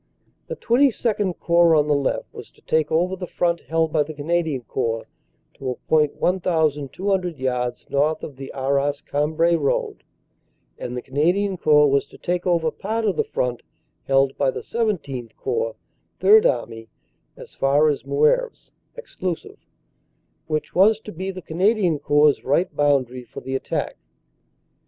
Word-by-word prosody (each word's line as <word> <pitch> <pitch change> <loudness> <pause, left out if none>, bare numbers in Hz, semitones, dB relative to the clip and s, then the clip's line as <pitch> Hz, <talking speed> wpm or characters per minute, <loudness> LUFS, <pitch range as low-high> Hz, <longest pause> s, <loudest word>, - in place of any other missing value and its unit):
"The - - -4
XXII 230 -6 +1
Corps 170 -1 +3
on 150 -1 +3
the 150 - +3
left 140 -2 -1
was - - -10
to - - -25
take 160 0 0
over 175 +4 +1
the 180 -1 -6
front 170 -1 0
held 160 -1 0
by 155 - +3
the 150 +1 -4
Canadian 155 -3 -1
Corps 115 -2 -2 0.5
to 135 - -5
a 125 - -2
point 150 +1 +1
1,200 175 +1 0
yards 125 -2 -2
north 150 +3 0
of 145 - -7
the 135 0 -8
Arras 140 +1 -1
Cambrai 155 +4 +1
Road, 145 -4 -1 0.8
and 125 0 -5
the 125 - -5
Canadian 175 +9 +1
Corps 150 -3 +4
was 140 0 +1
to - - -16
take 180 +1 -2
over 165 -3 +2
part 220 +6 -3
of 200 -4 +1
the - - +1
front 125 -1 -2 0.4
held 135 0 +2
by 140 - +3
the - - -5
XVII 160 - -2
Corps 460 +4 -2 0.4
(Third 435 +3 +6
Army) 115 - -3 0.5
as - - -12
far 140 +3 +3
as 145 -2 0
Moeuvres 470 +2 0 0.2
(exclusive), 185 - -6 0.9
which 155 -1 -3
was 205 +4 +4
to 210 - -9
be 185 +2 -5
the 185 -2 -7
Canadian 180 0 +1
Corps 145 0 +3
right 145 +4 0
boundary 135 -4 +1
for - - -10
the 130 - -6
attack. 135 - -3
155 Hz, 155 wpm, -22 LUFS, 140-185 Hz, 0.9 s, Third